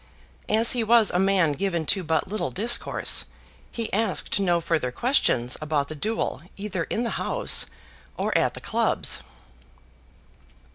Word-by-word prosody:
As 225 +2 +5
he 240 -2 0
was 225 -1 +4
a 180 - 0
man 190 -4 +3
given 170 0 -2
to 190 +4 +1
but 160 -2 0
little 215 +3 -2
discourse, 230 +5 +1 0.5
he 230 -2 -5
asked 210 -1 +1
no 175 -3 +2
further 155 -6 -1
questions 130 - +1
about 150 -2 -1
the 155 - -6
duel 220 +9 -3 0.2
either 195 -4 -3
in 230 - -2
the 230 - -2
House - - +1 0.5
or - - -2
at - - +1
the - - -8
Clubs. - - +1
190 Hz, 145 wpm, -24 LUFS, 160-220 Hz, 0.5 s, As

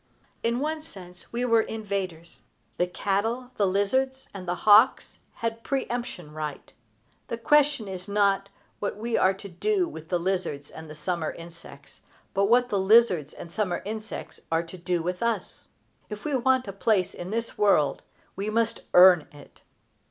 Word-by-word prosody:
In 235 +2 0
one 310 +1 -2
sense, 180 - -13
we 240 +1 -1
were 230 -2 +4
innovators. 195 -7 -5 0.4
The 180 - +1
cattle, 225 +7 -1
the 200 - +3
lizards, 260 +8 0
and 185 -2 -8
the 175 - 0
hawks 215 +5 +5 0.2
had 230 0 -4
pre 270 -1 -1
emption 235 -10 -5
right. 150 -2 -6 0.5
The 230 - -4
question 280 -2 +3
is 185 0 -7
not 200 -1 +2 0.3
what 205 - -3
we 230 +2 -2
are 190 +1 +3
to 200 +1 -10
do 365 - 0
with 160 - -10
the 180 - +2
lizards 170 -6 -2
and 160 -1 -10
summer 165 0 -2
insects, 165 -4 -12 0.3
but 200 0 +2
what 245 +3 +4
the 200 - +1
lizards 190 -7 +4
and 170 - -10
summer 195 -2 -2
insects 215 +1 -6
are 165 +1 +2
to 170 +2 -11
do 175 -1 -1
with 180 +1 -3
us. 235 -1 -2 0.4
If 210 -1 -8
we 295 -2 0
want 260 -1 +2
a 195 - -5
place 200 -2 +1
in 175 - -7
this 230 +2 -3
world 195 -8 +3 0.3
we 200 +2 -3
must 230 +1 0 0.2
earn 180 -3 +8
it. 145 - -16
200 Hz, 165 wpm, -26 LUFS, 180-230 Hz, 0.5 s, earn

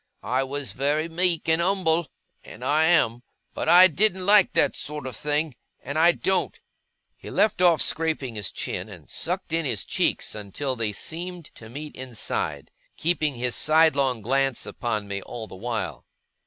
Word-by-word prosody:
I 130 +2 0
was 135 -3 -3
very 145 +6 0
meek 170 0 +1
and 160 +1 +3
umble 170 -3 +1 0.4
and 120 +4 -10
I 150 +3 +3
am. 135 -9 +3 0.3
But - - -2
I 175 +2 +9
didn't 185 +2 +2
like 205 -1 +6
that - - +2
sort 150 -1 -3
of 130 -3 -4
thing 150 +3 -1 0.3
and 140 +3 -7
I 170 +2 +7
don't!' 190 +2 -1 0.6
He - - -11
left 215 -4 +1
off 170 -3 +5
scraping 155 -6 -1
his 105 -3 -3
chin, - - -5
and - - -13
sucked 180 -1 -2
in 165 0 +1
his 120 -8 -1
cheeks - - 0
until 110 +6 -4
they 115 -3 -2
seemed 170 - -6
to 110 - -13
meet 145 +5 -8
inside; 130 -4 -4 0.3
keeping 155 -4 0
his 120 0 -1
sidelong 140 -7 +3
glance 135 +2 0
upon 105 -4 -3
me 100 0 -4
all 115 +3 -7
the - - -13
while. 110 -2 -4
150 Hz, 170 wpm, -25 LUFS, 120-170 Hz, 0.6 s, I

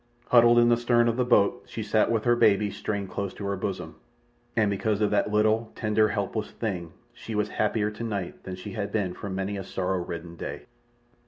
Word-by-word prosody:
Huddled 120 -1 +6
in 120 0 +6
the 120 - +4
stern 120 0 +3
of 115 - +1
the 125 - +1
boat 120 0 +3
she 110 - -5
sat 110 +1 +2
with 115 -2 +1
her 120 0 +4
baby 105 -2 +3
strained 100 -3 -4
close 100 0 -4
to 100 - -6
her 100 0 -1
bosom, 90 -4 -4 0.6
and 110 -3 +3
because 105 +1 0
of 105 -1 +1
that 105 0 +1
little 110 +2 +2
tender, 110 0 +2
helpless 105 +1 -2
thing 90 -7 -4 0.2
she 110 - -7
was 105 0 0
happier 105 0 0
tonight 105 -4 -4
than 95 - -6
she 90 - -8
had 105 -3 -4
been 100 -5 -1
for 100 - -7
many 95 +1 -3
a 95 - -4
sorrow 95 0 -2
ridden 85 0 -7
day. - - -6
105 Hz, 210 wpm, -27 LUFS, 100-110 Hz, 0.6 s, Huddled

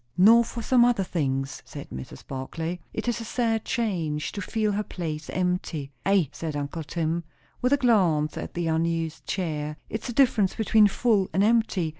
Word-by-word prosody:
"Nor 225 +6 +7
for 235 0 -6
some 245 +1 +5
other 240 -5 +3
things," 135 -6 -2
said - - -10
Mrs. 65 0 -8
Barclay. 160 +6 -4
"It 220 - -4
is 240 -1 0
a - - -4
sad 225 -1 0
change 170 -11 -1
to 200 - -5
feel 215 +1 0
her 205 +1 0
place 160 -6 -5
empty." 180 -6 -2 0.2
"Ay," 195 -7 +3
said 155 -1 -5
uncle 145 +3 -3
Tim, 165 +2 -2 0.4
with 250 +1 +2
a - - +5
glance 180 - +3
at - - -6
the 175 -1 -1
unused 165 0 -1
chair, 150 -5 -2
"it's 220 - -4
the 240 - -4
difference 225 -7 +3
between 220 -1 +5
full 205 -2 +2
and 190 +4 +3
empty. 220 -6 +2
180 Hz, 180 wpm, -26 LUFS, 155-220 Hz, 0.4 s, Nor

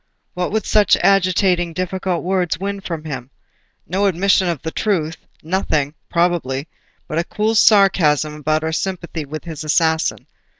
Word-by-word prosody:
What 180 -1 -2
would 220 0 -1
such 210 -2 +4
agitating, 185 -2 +2
difficult 185 0 -2
words 180 -2 0
win 200 +1 -3
from 165 -5 -5
him? 130 -5 -6 0.6
No 195 +3 +1
admission 190 +1 +2
of 170 -4 -1
the 160 - -3
truth; 165 -7 -1 0.3
nothing, 155 -4 -1 0.2
probably, 165 -5 0 0.4
but 155 - -1
a - - +1
cool 215 +5 -1
sarcasm 180 -9 +4
about 155 +1 -1
her 160 0 -2
sympathy 170 -3 -3
with 155 +2 -7
his 160 -3 -7
assassin. 160 +1 +1
175 Hz, 145 wpm, -19 LUFS, 155-190 Hz, 0.6 s, such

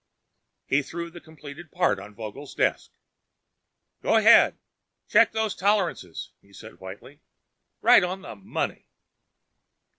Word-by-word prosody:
He 140 - +1
threw 170 +4 -7
the 175 0 -12
completed 155 0 -12
part 100 - +1
on 100 +2 -12
Vogel's 115 +7 -9
desk. - - 0 1.1
"Go - - +1
ahead, - - +6 0.5
check 225 0 +4
those 220 -2 -1
tolerances," 185 - -1
he 100 - -25
said 110 +2 -13
whitely. 100 +11 -11 0.6
"Right - - +7
on 185 +2 -4
the - - -9
money." 95 -1 -5
145 Hz, 120 wpm, -25 LUFS, -, 1.1 s, Right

